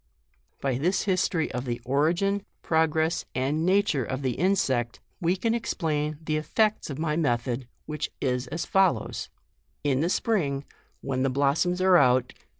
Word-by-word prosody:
" -, -, -41 dB
By 130 Hz, -2 st, 0 dB
this 180 Hz, +6 st, +1 dB
history 185 Hz, -4 st, 0 dB
of 125 Hz, +1 st, -4 dB
the 120 Hz, -1 st, -3 dB
origin, 170 Hz, +9 st, +1 dB, 0.2 s
progress 160 Hz, 0 st, +1 dB
and 140 Hz, +5 st, 0 dB
nature 190 Hz, -8 st, +2 dB
of 130 Hz, +3 st, -4 dB
the 130 Hz, -, +1 dB
insect, 130 Hz, -7 st, 0 dB, 0.2 s
we 175 Hz, 0 st, +1 dB
can 225 Hz, +4 st, 0 dB
explain 155 Hz, -9 st, -1 dB
the 155 Hz, -1 st, 0 dB
effects 210 Hz, +8 st, 0 dB
of 140 Hz, -, -5 dB
my 155 Hz, -1 st, -1 dB
method, 125 Hz, -4 st, -1 dB, 0.2 s
which 150 Hz, -1 st, -3 dB
is 125 Hz, -1 st, -1 dB
as 160 Hz, +6 st, -3 dB
follows: 195 Hz, -2 st, +1 dB, 0.3 s
— 70 Hz, -, -30 dB
Jn 140 Hz, -1 st, +2 dB
the 170 Hz, -, +1 dB
spring, 145 Hz, -11 st, 0 dB, 0.4 s
when 130 Hz, -2 st, -2 dB
the 135 Hz, -, +2 dB
blossoms 145 Hz, +7 st, +1 dB
are 185 Hz, -1 st, +6 dB
out, 125 Hz, -4 st, +4 dB
JUNE. -, -, -28 dB
150 Hz, 165 wpm, -26 LUFS, 130-180 Hz, 0.4 s, are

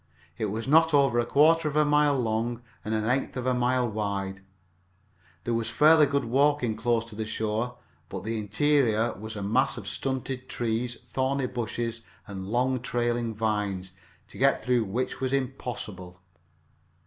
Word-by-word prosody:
It 110 Hz, -, -2 dB
was 110 Hz, +3 st, -3 dB
not 160 Hz, +2 st, +5 dB
over 135 Hz, -4 st, +4 dB
a 120 Hz, -, 0 dB
quarter 160 Hz, +2 st, +4 dB
of 150 Hz, -, -3 dB
a 150 Hz, 0 st, +4 dB
mile 145 Hz, -1 st, +3 dB
long 115 Hz, +1 st, -1 dB, 0.2 s
and 110 Hz, +1 st, -2 dB
an 110 Hz, 0 st, -1 dB
eighth 130 Hz, +2 st, 0 dB
of 125 Hz, -, -3 dB
a 130 Hz, -, +2 dB
mile 125 Hz, 0 st, +1 dB
wide. 100 Hz, -3 st, -3 dB, 1.0 s
There 120 Hz, -, -1 dB
was 115 Hz, -1 st, -1 dB
fairly 150 Hz, +4 st, +6 dB
good 140 Hz, 0 st, 0 dB
walking 135 Hz, -1 st, +2 dB
close 115 Hz, 0 st, 0 dB
to 115 Hz, -2 st, -12 dB
the 110 Hz, -, -3 dB
shore, 110 Hz, +2 st, -2 dB, 0.3 s
but -, -, -6 dB
the 110 Hz, +1 st, -2 dB
interior 115 Hz, 0 st, +2 dB
was 110 Hz, +2 st, -8 dB
a 100 Hz, -, -4 dB
mass 120 Hz, +5 st, +1 dB
of 105 Hz, -4 st, -7 dB
stunted 130 Hz, +2 st, -3 dB
trees, 120 Hz, -1 st, -2 dB
thorny 135 Hz, 0 st, 0 dB
bushes 115 Hz, -1 st, -3 dB, 0.2 s
and 95 Hz, -2 st, -7 dB
long 125 Hz, +4 st, +1 dB
trailing 120 Hz, -2 st, -1 dB
vines, 105 Hz, -4 st, -2 dB, 0.4 s
to -, -, -12 dB
get -, -, +3 dB
through 125 Hz, -3 st, +2 dB
which 120 Hz, +8 st, -3 dB
was 130 Hz, 0 st, -1 dB
impossible. 120 Hz, -9 st, -4 dB
120 Hz, 165 wpm, -27 LUFS, 110-130 Hz, 1.0 s, fairly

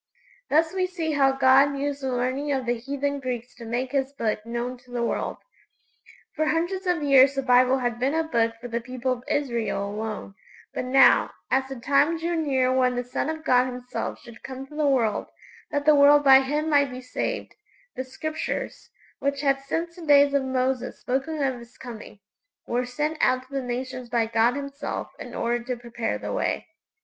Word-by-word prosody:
Thus 320 Hz, +3 st, +3 dB
we 370 Hz, -1 st, 0 dB
see 340 Hz, -3 st, -3 dB
how 275 Hz, -2 st, +3 dB
God 270 Hz, +1 st, +4 dB
used 285 Hz, 0 st, -2 dB
the 265 Hz, -1 st, -2 dB
learning 255 Hz, +4 st, -1 dB
of 265 Hz, -2 st, -1 dB
the 240 Hz, 0 st, +1 dB
heathen 280 Hz, +3 st, -2 dB
Greeks 250 Hz, -2 st, -5 dB
to 235 Hz, -, -11 dB
make 245 Hz, +3 st, -2 dB
His 275 Hz, -1 st, 0 dB
Book 215 Hz, -5 st, -2 dB
known 240 Hz, +1 st, -4 dB
to 250 Hz, 0 st, -23 dB
the 240 Hz, -1 st, -2 dB
world! -, -, -2 dB, 1.0 s
For 310 Hz, -, +1 dB
hundreds 350 Hz, +4 st, -1 dB
of 350 Hz, -4 st, +1 dB
years 275 Hz, -1 st, +6 dB
the 270 Hz, -, -1 dB
Bible 255 Hz, +1 st, +4 dB
had 240 Hz, -2 st, -2 dB
been 270 Hz, +5 st, +1 dB
a 325 Hz, -, +2 dB
Book 230 Hz, -7 st, 0 dB
for 245 Hz, -, -7 dB
the 235 Hz, 0 st, -3 dB
people 255 Hz, +1 st, -3 dB
of 245 Hz, -1 st, -3 dB
Israel 235 Hz, -7 st, -1 dB
alone; 210 Hz, -1 st, -5 dB, 0.4 s
but -, -, -3 dB
now, 265 Hz, +2 st, +5 dB, 0.2 s
as 265 Hz, 0 st, +1 dB
the 270 Hz, -, -5 dB
time 280 Hz, +6 st, +2 dB
drew 340 Hz, +1 st, -2 dB
near 265 Hz, -5 st, +1 dB
when 255 Hz, -1 st, +2 dB
the 245 Hz, -, -1 dB
Son 250 Hz, +4 st, -3 dB
of 315 Hz, 0 st, -4 dB
God 250 Hz, -4 st, +4 dB
Himself 250 Hz, 0 st, -5 dB
should 235 Hz, -2 st, -14 dB
come 265 Hz, 0 st, -7 dB
to 295 Hz, -, -14 dB
the 300 Hz, -1 st, +1 dB
world 240 Hz, -6 st, +1 dB, 0.4 s
that 290 Hz, -1 st, -2 dB
the 305 Hz, -, +7 dB
world 290 Hz, 0 st, +6 dB
by 270 Hz, -1 st, +8 dB
Him 295 Hz, +3 st, -1 dB
might 285 Hz, -3 st, +3 dB
be 250 Hz, 0 st, -7 dB
saved -, -, -3 dB, 0.4 s
the 260 Hz, -, -3 dB
Scriptures, 310 Hz, +4 st, -5 dB, 0.3 s
which 280 Hz, 0 st, -1 dB
had 275 Hz, -1 st, +2 dB
since 335 Hz, +5 st, -3 dB
the 350 Hz, -, -10 dB
days 285 Hz, -1 st, +6 dB
of 280 Hz, -, +3 dB
Moses 260 Hz, -1 st, -1 dB
spoken 280 Hz, +4 st, -2 dB
of 260 Hz, -2 st, -1 dB
His 235 Hz, +1 st, -15 dB
coming, 220 Hz, -4 st, -10 dB, 0.4 s
were 245 Hz, +1 st, -1 dB
sent 300 Hz, +5 st, -2 dB
out 255 Hz, 0 st, +3 dB
to 260 Hz, +2 st, -19 dB
the 275 Hz, -, -1 dB
nations 255 Hz, 0 st, -5 dB
by 235 Hz, -1 st, +2 dB
God 225 Hz, +2 st, +2 dB
Himself 280 Hz, 0 st, -5 dB
in -, -, -8 dB
order 235 Hz, 0 st, -1 dB
to 250 Hz, 0 st, -3 dB
prepare 235 Hz, -1 st, -3 dB
the -, -, -5 dB
way. -, -, -1 dB
265 Hz, 200 wpm, -25 LUFS, 245-285 Hz, 1.0 s, by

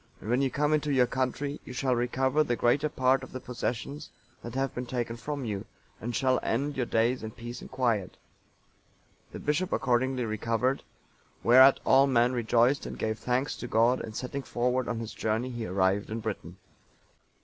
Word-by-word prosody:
And 110 Hz, -, -5 dB
when 125 Hz, +2 st, +3 dB
you 135 Hz, -, +2 dB
come 150 Hz, +3 st, +1 dB
into 150 Hz, -1 st, +1 dB
your 130 Hz, -3 st, +4 dB
country, 135 Hz, +3 st, -2 dB
you 125 Hz, -, -9 dB
shall 130 Hz, 0 st, 0 dB
recover 130 Hz, +4 st, +1 dB
the 120 Hz, -5 st, 0 dB
greater 140 Hz, +6 st, +2 dB
part 130 Hz, -1 st, +2 dB
of 130 Hz, -, -10 dB
the 130 Hz, -, -4 dB
possessions 125 Hz, +3 st, -4 dB, 0.3 s
that 120 Hz, +1 st, -8 dB
have 135 Hz, 0 st, -1 dB
been 125 Hz, 0 st, -5 dB
taken 120 Hz, -2 st, -3 dB
from 140 Hz, +3 st, -5 dB
you, 100 Hz, -3 st, -3 dB, 0.4 s
and 120 Hz, +1 st, -4 dB
shall 130 Hz, -1 st, +2 dB
end 140 Hz, +5 st, -1 dB
your 125 Hz, -3 st, -1 dB
days 115 Hz, +3 st, +1 dB
in 110 Hz, -, -5 dB
peace 120 Hz, +2 st, -8 dB
and -, -, -10 dB
quiet.' 120 Hz, -7 st, -1 dB, 0.6 s
" -, -, -36 dB
The -, -, -7 dB
bishop 150 Hz, +5 st, -1 dB
accordingly 125 Hz, 0 st, +1 dB
recovered, 115 Hz, +4 st, 0 dB, 0.6 s
whereat 130 Hz, +3 st, +7 dB
all 135 Hz, +1 st, +6 dB
men 125 Hz, -1 st, +3 dB
rejoiced 120 Hz, +3 st, +2 dB
and -, -, -7 dB
gave 110 Hz, -1 st, -2 dB
thanks 125 Hz, +4 st, -1 dB
to 120 Hz, -, -6 dB
God, 120 Hz, +3 st, +3 dB
and 110 Hz, -1 st, -7 dB
setting 130 Hz, +3 st, -4 dB
forward 125 Hz, 0 st, -1 dB
on 120 Hz, -, -2 dB
his 115 Hz, -1 st, -5 dB
journey, 115 Hz, +4 st, -1 dB
he 120 Hz, -2 st, -4 dB
arrived 95 Hz, +2 st, +1 dB
in 110 Hz, +1 st, -3 dB
Britain. 100 Hz, -5 st, -5 dB
125 Hz, 190 wpm, -28 LUFS, 115-135 Hz, 0.6 s, whereat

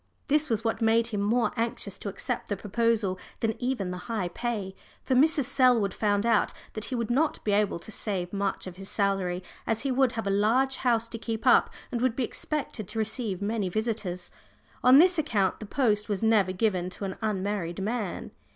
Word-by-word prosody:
This 300 Hz, +1 st, +2 dB
was 225 Hz, -2 st, 0 dB
what 225 Hz, 0 st, -1 dB
made 225 Hz, +1 st, +4 dB
him 215 Hz, -4 st, -2 dB
more 230 Hz, +4 st, +2 dB
anxious 230 Hz, -4 st, -3 dB
to 205 Hz, -, -4 dB
accept 245 Hz, +5 st, -4 dB
the 205 Hz, -, -1 dB
proposal 210 Hz, -2 st, 0 dB, 0.2 s
than 225 Hz, -1 st, +1 dB
even 245 Hz, -7 st, -1 dB
the 180 Hz, -, -5 dB
high 210 Hz, -6 st, -1 dB
pay. 205 Hz, -1 st, -3 dB, 0.3 s
For 265 Hz, -, 0 dB
Mrs. 290 Hz, +3 st, +4 dB
Selwood 245 Hz, -7 st, +3 dB
found 205 Hz, 0 st, +1 dB
out 230 Hz, -3 st, +2 dB, 0.2 s
that 215 Hz, -1 st, -3 dB
he 255 Hz, -, -3 dB
would 235 Hz, -1 st, -2 dB
not 295 Hz, +5 st, +2 dB
be 210 Hz, -, 0 dB
able 205 Hz, -2 st, +2 dB
to 170 Hz, -, -11 dB
save 190 Hz, -4 st, -3 dB
much 200 Hz, -1 st, -1 dB
of 185 Hz, -1 st, -8 dB
his 195 Hz, 0 st, -6 dB
salary, 195 Hz, -3 st, 0 dB, 0.2 s
as 225 Hz, 0 st, +1 dB
he 275 Hz, -, -1 dB
would 260 Hz, -1 st, +3 dB
have 225 Hz, -2 st, -3 dB
a 200 Hz, -, +1 dB
large 240 Hz, +7 st, +2 dB
house 235 Hz, -3 st, +1 dB
to 230 Hz, -, -6 dB
keep 225 Hz, +1 st, -4 dB
up, 250 Hz, -, +6 dB, 0.2 s
and 235 Hz, -, -2 dB
would 255 Hz, -2 st, +1 dB
be 260 Hz, -, 0 dB
expected 245 Hz, -5 st, -4 dB
to 225 Hz, -, -5 dB
receive 220 Hz, -3 st, -2 dB
many 205 Hz, -2 st, -1 dB
visitors. 205 Hz, -4 st, -3 dB, 0.5 s
On 255 Hz, +2 st, +8 dB
this 355 Hz, +2 st, +6 dB
account 200 Hz, -10 st, +1 dB
the 215 Hz, -, -7 dB
post 215 Hz, -4 st, +1 dB
was 205 Hz, 0 st, -1 dB
never 215 Hz, -4 st, +4 dB
given 185 Hz, -2 st, 0 dB
to 190 Hz, +2 st, -6 dB
an 190 Hz, -, -4 dB
unmarried 200 Hz, -4 st, -2 dB
man. 210 Hz, -1 st, -3 dB
220 Hz, 205 wpm, -28 LUFS, 195-240 Hz, 0.5 s, On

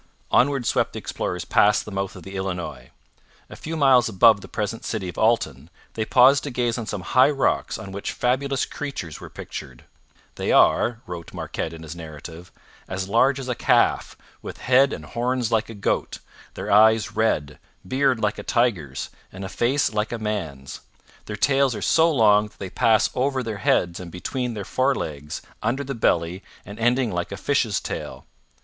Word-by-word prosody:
Onward 135 Hz, 0 st, +3 dB
swept -, -, +1 dB
the -, -, -6 dB
explorers 90 Hz, -1 st, -4 dB
past 105 Hz, 0 st, +3 dB
the 105 Hz, -, -8 dB
mouth 95 Hz, -1 st, -3 dB
of -, -, -11 dB
the 95 Hz, 0 st, -9 dB
Illinois. 90 Hz, -10 st, -5 dB, 0.6 s
A -, -, -8 dB
few 160 Hz, +1 st, -5 dB
miles 130 Hz, -5 st, +5 dB
above 110 Hz, 0 st, +5 dB
the -, -, -10 dB
present 110 Hz, +1 st, -4 dB
city 105 Hz, -5 st, -3 dB
of 90 Hz, -, -7 dB
Alton 80 Hz, -, +1 dB, 0.2 s
they 110 Hz, -, -2 dB
paused 130 Hz, +4 st, +5 dB
to -, -, -3 dB
gaze 120 Hz, -2 st, -1 dB
on 115 Hz, -, -5 dB
some 105 Hz, -3 st, -4 dB
high 130 Hz, +9 st, +4 dB
rocks 140 Hz, -2 st, 0 dB
on 95 Hz, -, -8 dB
which 100 Hz, +1 st, -4 dB
fabulous 130 Hz, +2 st, 0 dB
creatures 135 Hz, -, -6 dB
were -, -, -9 dB
pictured. 65 Hz, -2 st, -9 dB, 0.5 s
'They -, -, -1 dB
are,' 120 Hz, -1 st, +4 dB
wrote 85 Hz, -2 st, -8 dB
Marquette 80 Hz, -, -4 dB
in 80 Hz, -1 st, -10 dB
his 80 Hz, +1 st, -8 dB
narrative, 80 Hz, +1 st, -10 dB, 0.4 s
'as 95 Hz, 0 st, -4 dB
large 125 Hz, +6 st, +3 dB
as 130 Hz, -, -6 dB
a 125 Hz, -, 0 dB
calf, -, -, +2 dB, 0.2 s
with -, -, -8 dB
head 130 Hz, +2 st, +4 dB
and -, -, -6 dB
horns 120 Hz, 0 st, -1 dB
like 115 Hz, -1 st, +1 dB
a 115 Hz, -, -8 dB
goat; 100 Hz, -, -1 dB, 0.4 s
their -, -, -4 dB
eyes 110 Hz, +1 st, +5 dB
red; 75 Hz, -10 st, 0 dB, 0.3 s
beard 130 Hz, +1 st, +2 dB
like 105 Hz, -1 st, -1 dB
a -, -, -6 dB
tiger's, 100 Hz, -, -1 dB, 0.2 s
and 95 Hz, +1 st, -7 dB
a -, -, -6 dB
face 125 Hz, +5 st, +1 dB
like 105 Hz, 0 st, -1 dB
a 120 Hz, -, -2 dB
man's. 80 Hz, -12 st, -5 dB, 0.4 s
Their 105 Hz, -, -5 dB
tails 135 Hz, +2 st, +2 dB
are -, -, -6 dB
so 165 Hz, +1 st, +4 dB
long 105 Hz, -6 st, +4 dB
that -, -, -22 dB
they 95 Hz, -2 st, -7 dB
pass 110 Hz, +2 st, +3 dB
over 130 Hz, 0 st, 0 dB
their 110 Hz, -3 st, -5 dB
heads 85 Hz, -3 st, +1 dB
and 90 Hz, -2 st, -8 dB
between 120 Hz, +7 st, -3 dB
their 100 Hz, -2 st, -5 dB
forelegs, 80 Hz, -, -2 dB, 0.2 s
under 125 Hz, +6 st, -1 dB
the 135 Hz, 0 st, -4 dB
belly, 90 Hz, -5 st, 0 dB, 0.2 s
and 100 Hz, +2 st, -10 dB
ending 120 Hz, 0 st, +2 dB
like 85 Hz, 0 st, -3 dB
a 100 Hz, -, -5 dB
fish's 115 Hz, -3 st, 0 dB
tail. -, -, -6 dB
110 Hz, 185 wpm, -23 LUFS, 95-125 Hz, 0.6 s, miles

